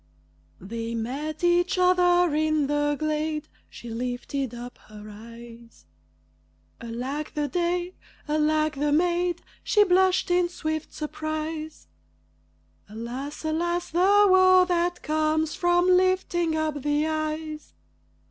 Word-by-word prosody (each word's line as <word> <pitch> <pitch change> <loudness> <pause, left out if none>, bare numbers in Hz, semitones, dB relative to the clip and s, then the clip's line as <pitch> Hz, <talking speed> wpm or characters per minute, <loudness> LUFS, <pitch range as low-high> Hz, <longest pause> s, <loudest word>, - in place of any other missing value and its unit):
They 230 +4 -5
met 285 +8 -4
each 350 +1 +2
other 355 -2 +3
in 310 -1 +1
the 290 +1 0
glade 310 0 -2 0.2
She 240 - -10
lifted 250 +2 -3
up 245 +1 -9
her 210 0 -12
eyes; 230 - -13 1.0
Alack 255 +6 -5
the 295 -1 -1
day! 350 +3 -1 0.3
Alack 305 0 +1
the 295 +1 0
maid! 345 +2 +1 0.2
She 420 - +4
blushed 370 -1 +2
in 355 0 +2
swift 315 -2 -4
surprise. 310 0 -5 1.0
Alas! 245 +8 -6
alas! 345 +2 -1
the 395 +5 +5
woe 370 -1 +6
that 350 0 0
comes 310 0 0
from 350 0 +2
lifting 365 -2 +2
up 310 -2 -2
the 295 +2 +1
eyes. 310 0 -4
310 Hz, 110 wpm, -25 LUFS, 285-350 Hz, 1.0 s, woe